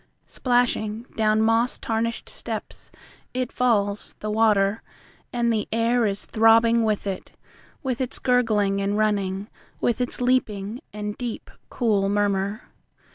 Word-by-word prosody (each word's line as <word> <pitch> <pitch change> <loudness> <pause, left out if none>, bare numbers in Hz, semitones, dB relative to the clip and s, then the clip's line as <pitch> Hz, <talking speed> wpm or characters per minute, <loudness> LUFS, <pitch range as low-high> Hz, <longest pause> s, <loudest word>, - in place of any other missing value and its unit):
Splashing 235 -3 0
down 215 0 +3
moss 225 +2 +2
tarnished 230 +1 -2
steps - - -6 0.4
It 255 -1 -1
falls, 210 -5 0
the 215 - -3
water; 210 -1 +3 0.5
And 235 -1 +1
the 215 -2 -1
air 230 +1 +2
is 200 0 -2
throbbing 230 +1 +4
with 215 -2 0
it. 195 -2 -5 0.5
With 260 -1 -2
its 255 0 -2
gurgling 215 -6 +2
and 200 +1 0
running. 200 -2 0 0.3
With 240 +1 0
its 245 - -1
leaping, 235 -3 0
and 210 0 -4
deep, 240 -2 -5 0.2
cool 205 -5 +1
murmur. 200 0 0
220 Hz, 130 wpm, -24 LUFS, 205-235 Hz, 0.5 s, throbbing